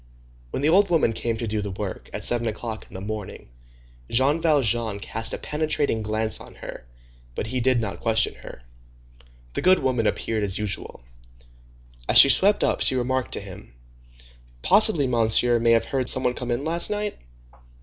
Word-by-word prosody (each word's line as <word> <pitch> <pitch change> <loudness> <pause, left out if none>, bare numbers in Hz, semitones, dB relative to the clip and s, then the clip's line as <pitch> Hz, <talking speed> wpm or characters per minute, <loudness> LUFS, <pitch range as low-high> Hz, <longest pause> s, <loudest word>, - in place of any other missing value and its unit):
When 130 - -4
the 150 - +3
old 195 +4 +4
woman 160 -9 +2
came 115 0 -2
to 115 - -4
do 110 -1 -2
the 100 - -5
work, 95 0 -6
at - - -5
seven 120 -1 0
o'clock 110 0 -6
in - - -16
the 95 - -7
morning, 105 - -7 0.6
Jean 140 +7 +2
Valjean 120 -9 +1
cast 115 +2 -3
a - - -3
penetrating 150 -6 -1
glance 110 +1 -1
on - - -13
her, - - -10 0.5
but - - -3
he 125 +3 -3
did 130 0 +2
not 110 -3 -4
question 115 -1 0
her. - - -12 0.9
The - - -3
good 185 +1 +5
woman 125 -4 0
appeared 110 0 -2
as 95 -2 -1
usual. 105 -11 -4 1.1
As - - +4
she 140 - +10
swept 200 +9 +4
up - - 0
she - - +3
remarked 130 0 -2
to - - -3
him:— 95 -11 -12 0.9
"Possibly 200 -8 +5
Monsieur 120 0 +2
may 115 0 +3
have 115 - +2
heard 130 -2 -1
some 130 - +2
one 125 - +1
come 125 0 -6
in 120 +4 -2
last 170 +2 +1
night?" 210 0 -3
120 Hz, 180 wpm, -23 LUFS, 110-140 Hz, 1.1 s, she